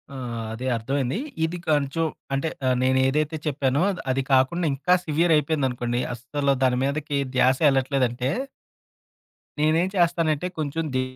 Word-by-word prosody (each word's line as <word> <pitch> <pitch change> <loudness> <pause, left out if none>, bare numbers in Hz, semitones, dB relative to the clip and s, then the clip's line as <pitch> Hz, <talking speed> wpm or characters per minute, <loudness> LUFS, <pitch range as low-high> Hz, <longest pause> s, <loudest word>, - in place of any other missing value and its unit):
ఆ! - - -6 0.4
అదే 125 +3 -5
అర్థవైంది. 130 - -1 0.3
ఇది 175 +2 -4
కొంచెం 150 +2 +1 0.3
అంటే 140 +4 0 0.3
నేనేదైతో 135 +4 +2
చెప్పానో, 140 0 +1 0.3
అది 135 +1 0
కాకుండా, 150 +7 +3
ఇంకా 180 +7 +1
సివియరయిపోయిందనుకోండి. 145 -6 +1
అస్సలు 140 +4 -1
దాని 125 -1 +3
మీదకి 145 +1 -1 0.2
ద్యాసే 130 +4 +3
ఎళ్ళట్లేదంటే 130 -2 0 1.3
నేనేం 160 +4 +3
చేస్తానంటే 165 -2 +1
కొంచెం, 155 +2 -2
ది 130 - +2
140 Hz, 115 wpm, -24 LUFS, 130-155 Hz, 1.3 s, కాకుండా